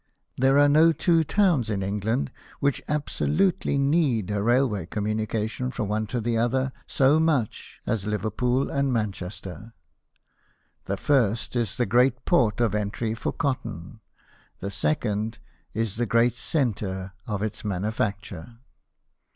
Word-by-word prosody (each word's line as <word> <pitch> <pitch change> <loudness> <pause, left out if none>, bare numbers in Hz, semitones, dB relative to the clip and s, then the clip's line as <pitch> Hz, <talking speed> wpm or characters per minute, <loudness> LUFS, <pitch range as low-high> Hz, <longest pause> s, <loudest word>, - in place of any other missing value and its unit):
There 135 +2 +3
are 145 0 +6
no 155 +3 +6
two 165 0 +3
towns 165 - +2
in 100 -3 -1
England 100 - -1 0.3
which 140 -1 +1
absolutely 150 +3 0
need 140 - +2
a 100 -1 0
railway 115 -5 +2
communication 110 +4 -2
from 115 -5 -3
one 110 +1 -1
to 120 +3 -2
the 115 0 0
other 130 +3 +1
so 140 +3 +4
much 150 -9 -1
as 105 -3 -1
Liverpool 120 +5 0
and 140 -1 +1
Manchester. 100 -2 -4 1.1
The - - -2
first 120 -5 +1
is 120 -5 0
the 120 - +1
great 125 +6 +2
port 120 - +3
of 115 -4 +2
entry 105 +2 -1
for 115 - -3
cotton, 115 - -3 0.6
the 100 - -4
second 110 0 -1 0.3
is 110 -1 -2
the 120 0 0
great 115 +3 +3
centre 100 - -2
of 105 -1 -2
its 110 - -3
manufacture. 100 0 -3
115 Hz, 135 wpm, -25 LUFS, 105-135 Hz, 1.1 s, are